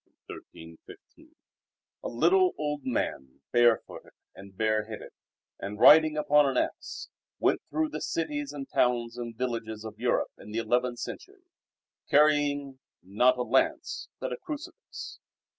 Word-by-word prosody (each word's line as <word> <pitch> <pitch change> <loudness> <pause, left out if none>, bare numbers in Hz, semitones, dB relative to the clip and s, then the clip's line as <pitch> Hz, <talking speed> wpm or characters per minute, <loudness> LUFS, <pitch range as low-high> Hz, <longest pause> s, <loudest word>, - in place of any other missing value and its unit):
1315) 80 0 -13
I - - -36 0.7
A - - -3
little 180 +9 +3
old 150 -2 -3
man, 70 - -3
barefooted 120 -1 +2 0.2
and 95 0 -14
bareheaded, 110 0 -1 0.5
and 105 +1 -6
riding 155 +2 +7
upon 150 -1 +4
an 130 - -2
ass, - - -3 0.3
went - - +1
through 155 +1 0
the 155 - -6
cities 145 -3 -2
and 140 -2 -7
towns 120 -1 +1
and 120 -2 -6
villages 115 -3 -4
of 110 -1 -9
Europe, 120 +1 0
in - - -12
the 110 - -4
eleventh 120 +2 0
century, 380 - -8 0.7
carrying 145 -2 +3 0.2
not 125 +7 +3
a 125 - 0
lance, 320 - 0
but - - -3
a - - -5
crucifix. 320 -1 -8
125 Hz, 135 wpm, -28 LUFS, 110-150 Hz, 0.7 s, riding